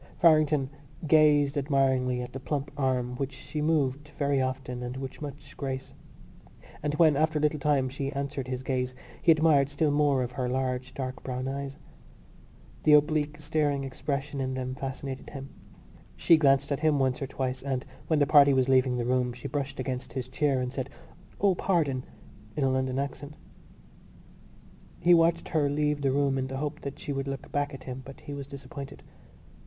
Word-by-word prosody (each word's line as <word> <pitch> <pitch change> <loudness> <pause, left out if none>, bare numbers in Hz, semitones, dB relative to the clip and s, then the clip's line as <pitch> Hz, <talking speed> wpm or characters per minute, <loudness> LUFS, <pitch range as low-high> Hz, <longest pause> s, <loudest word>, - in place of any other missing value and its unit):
Farrington 155 -4 +4 0.3
gazed 150 -2 +4
admiringly 130 -3 +1
at 125 - -9
the 135 - -5
plump 140 +1 -3
arm 130 -3 0
which 135 0 -3
she 150 +3 -5
moved 150 -2 +1
very 140 -2 0
often 130 -1 -3
and 125 +1 -5
with 135 +1 -7
much 145 0 -8
grace; 135 -1 -4 0.9
and 150 0 -1
when, 155 -2 +5
after 155 +2 +2
a - - 0
little 150 0 +2
time, 140 -2 +2
she 135 +1 -3
answered 140 -1 -3
his 130 0 -4
gaze 130 -1 -1 0.3
he 170 - +6
admired 155 -3 +4
still 145 +1 +1
more 145 -3 +3
her 125 0 -3
large 130 0 -2
dark 130 -1 -4
brown 130 0 -4
eyes. 140 +1 -4 1.0
The 150 - +5
oblique 150 0 +3
staring 145 -2 0
expression 140 +1 -3
in 130 0 -2
them 130 0 -3
fascinated 135 0 -5
him. 135 -1 -8 0.7
She 170 - +5
glanced 140 -3 +3
at 140 - 0
him 155 -1 +3
once 130 -1 +1
or 135 - -2
twice 130 -1 -3
and, 130 -1 -2 0.2
when 160 - +2
the 145 - +4
party 140 -1 +6
was 130 -1 +3
leaving 130 -1 +4
the 120 - -1
room, 125 0 +1
she 125 - -7
brushed 140 -2 -3
against 130 -1 -4
his 130 -2 -3
chair 135 0 +1
and 125 0 -3
said 135 -1 -3 0.5
"O, 200 -1 +4
pardon!" 150 -9 0 0.5
in 150 - 0
a 135 - +3
London 130 0 0
accent. 140 +1 -4 1.6
He 175 - +5
watched 165 0 +3
her 150 -3 +2
leave 150 0 0
the 135 -1 +2
room 140 -1 +1
in 130 - -2
the 135 0 -5
hope 150 +2 -3
that 140 -1 -6
she 145 - -4
would 135 0 -3
look 135 0 -5
back 145 0 0
at 135 -2 -9
him, 130 0 -6
but 135 +1 -12
he 145 - -7
was 140 -1 -6
disappointed. 140 0 -9
140 Hz, 185 wpm, -28 LUFS, 130-145 Hz, 1.6 s, he